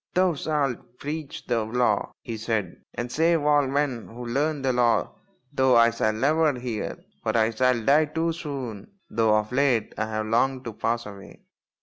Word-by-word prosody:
" - - -54
Thou 185 -1 +3
shalt 140 -5 -2
preach 150 +1 -6
the 115 -2 0
Law," 110 -2 0
he 115 - -5
said, 110 -5 -3
" - - -64
and 120 0 -4
save 165 +1 +2
all 145 -2 +3
men 135 -4 -1
who 120 +2 -9
learn 140 +4 -1
the 130 -1 +2
Law, 120 -1 +2 0.4
though 130 -2 +4
I 115 0 +6
shall 110 - +1
never 150 +8 +2
hear; 120 -4 -4 0.2
for - - 0
I 110 0 +3
shall 125 +2 +2
die 150 +3 +5
too 160 +2 -1
soon, 135 - -6 0.2
though 110 -1 +3
of 105 +1 -2
late 125 -3 +1
I 105 - 0
have 110 0 -2
longed 130 +4 +1
to 115 - -5
pass 115 +2 -1
away." 100 -1 -11
125 Hz, 190 wpm, -25 LUFS, 115-145 Hz, 0.4 s, I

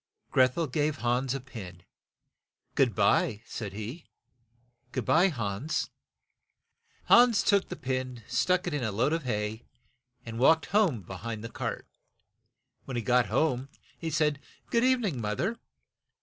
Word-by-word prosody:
Greth 130 +1 +4
el 165 - +1
gave 150 +2 0
Hans 125 +2 +1
a - - -2
pin. 100 -9 -10 0.9
"Good 125 -7 +2
by," 105 - +2
said 105 -5 -6
he. 110 - -7 0.8
"Good 125 -1 -3
by, 175 +4 +5
Hans." 120 - -2 1.1
Hans 240 -3 +6
took 200 -1 +2
the 180 - -4
pin, 130 -4 -3
stuck 180 +9 +1
it - - -2
in 145 -4 -1
a 110 - -1
load 120 +9 +1
of 165 -4 -2
hay, 105 -1 -2 0.6
and 115 0 -6
walked 160 +5 +5
home 180 - +2
be 95 - -9
hind 110 +3 -6
the 115 - -5
cart. - - -4 1.0
When 130 -3 -4
he 120 - -2
got 125 -1 +3
home 130 +3 0 0.3
he 165 - -4
said, 150 -2 +1 0.3
"Good 235 0 +3
eve 255 -1 +3
ning, 165 - -2
moth 105 +2 -2
er." 220 - -1
130 Hz, 155 wpm, -29 LUFS, 115-160 Hz, 1.1 s, Hans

